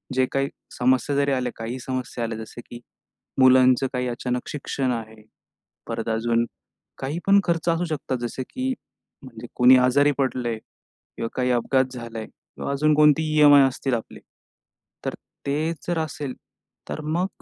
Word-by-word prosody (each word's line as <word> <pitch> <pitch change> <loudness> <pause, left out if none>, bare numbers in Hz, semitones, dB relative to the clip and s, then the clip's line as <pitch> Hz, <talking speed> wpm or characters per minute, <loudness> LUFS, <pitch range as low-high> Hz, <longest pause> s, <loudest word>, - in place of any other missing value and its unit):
जे 130 - +4
काही 135 +1 0 0.3
समस्या 130 +3 +2
जरी 140 0 +2
आल्या, 125 -2 0
काही 115 +3 -5
समस्या 130 -1 -4
आल्या, 115 -1 -3
जसे 110 +2 -9
की 120 - -10 0.6
मुलांचं 130 0 +6
काही 125 0 -1
अचानक 125 +1 -3
शिक्षण 135 -2 -2
आहे. 110 -1 -7 0.6
परत - - -3
अजून 115 +1 +1 0.5
काहीपण 170 +9 +2
खर्च 170 0 0
असू 170 +1 +1
शकतो, 150 -4 -3
जसं 130 +2 -4
की 260 0 -2 0.5
म्हणजे 120 -2 -10
कोणी 125 +1 +7
आजारी 130 +3 +4
पडलं 130 -2 0
आहे 115 - -2
किंवा 115 +1 -10
काही 125 -1 +1
अपघात 130 +2 +2
झाला 115 -2 -7
आहे 110 - -6
किंवा - - -8
अजून 150 +2 +2
कोणतीही 155 +1 +4
ई-एम-आय 145 -1 +8
असतील. 130 0 -2
आपली 115 - -7 0.9
तर - - -1 0.3
ते 155 +4 0 0.2
जर 175 -2 0
असेल, 145 -4 -5 0.6
तर 155 - -4
मग 165 +5 0
130 Hz, 155 wpm, -24 LUFS, 120-150 Hz, 0.9 s, ई-एम-आय